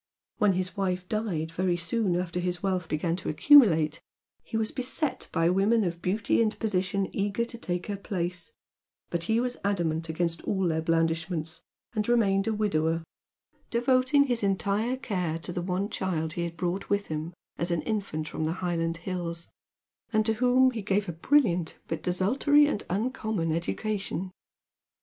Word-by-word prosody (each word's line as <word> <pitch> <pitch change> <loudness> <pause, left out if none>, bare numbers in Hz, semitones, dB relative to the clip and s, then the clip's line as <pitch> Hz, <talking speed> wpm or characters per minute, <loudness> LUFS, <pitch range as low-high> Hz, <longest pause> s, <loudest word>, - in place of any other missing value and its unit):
When 210 -3 +4
his 185 +1 -2
wife 185 -2 -1
died 180 -8 -2
very 175 +1 0
soon 180 +2 0
after 180 0 -2
his 180 +1 -2
wealth 185 -3 -1
began 165 +2 0
to 190 - -4
accumulate, 165 - +6 0.4
he 225 - -3
was 220 -1 0
beset 260 +3 -2
by 165 -1 +2
women 210 +4 +3
of 170 -2 -3
beauty 205 +6 +1
and 220 -1 +1
position 195 -2 0
eager 205 +3 0
to 235 - -8
take 180 -4 -3
her 205 -1 -3
place, 180 - -3 0.6
but 170 -1 -2
he 220 +4 +2
was 250 0 -1
adamant 165 -5 0
against 165 +1 -1
all 190 -2 0
their 160 0 0
blandishments 165 0 -1 0.3
and 215 0 -1
remained 200 -4 +3
a 220 - +1
widower, 165 -6 +1 0.7
devoting 255 +4 +3
his 245 -4 0
entire 200 +5 0
care 180 - -2
to 175 +2 -5
the 175 - -2
one 185 +2 -1
child 165 -6 -2
he 170 0 -2
had 170 0 -6
brought 180 +2 -2
with 200 0 +1
him 160 +2 -5 0.2
as 170 - 0
an 170 -2 0
infant 200 -8 -2
from 155 - -3
the 160 - 0
Highland 170 -2 -1
hills, 170 -2 -4 0.6
and 215 -1 +2
to 225 - +3
whom 255 +3 +4
he 230 -3 -4
gave 200 0 0
a - - -3
brilliant 180 - +2
but 165 - -3
desultory 255 +11 +3
and 290 -8 -1
uncommon 215 -4 -1
education. 190 +1 -2
185 Hz, 170 wpm, -28 LUFS, 170-220 Hz, 0.7 s, accumulate